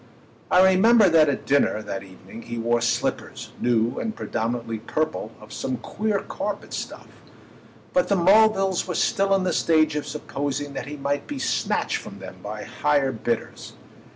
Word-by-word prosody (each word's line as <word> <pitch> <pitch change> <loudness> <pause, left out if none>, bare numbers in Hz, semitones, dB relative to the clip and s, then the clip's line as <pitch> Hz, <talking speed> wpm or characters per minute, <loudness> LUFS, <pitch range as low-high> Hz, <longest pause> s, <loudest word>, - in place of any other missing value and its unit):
I 180 - +6
remember 205 +2 +5
that 160 -3 +5
at 140 - -2
dinner 135 -6 +2
that 95 - -5
evening 95 +3 -12
he 120 0 -6
wore 120 +1 +1
slippers, 120 - -2
new 120 -1 +1
and 220 -1 -3
predominantly 115 0 -3
purple, 155 -1 -2
of 110 0 -13
some 130 -1 -3
queer 210 - -2
carpet - - -5
stuff; - - -6 0.9
but 270 - +3
the 200 - +2
Mulvilles 195 0 +4
were 180 - -3
still 195 +4 +2
in 190 - +1
the 180 -2 0
stage 155 -2 +3
of 150 - -3
supposing 145 -1 -4
that 135 - -5
he 145 +1 -6
might 140 +1 -2
be 290 - -5
snatched 265 - 0
from - - -9
them - - -10
by - - -6
higher 145 -3 +1
bidders. 115 -1 -4
145 Hz, 165 wpm, -24 LUFS, 120-190 Hz, 0.9 s, I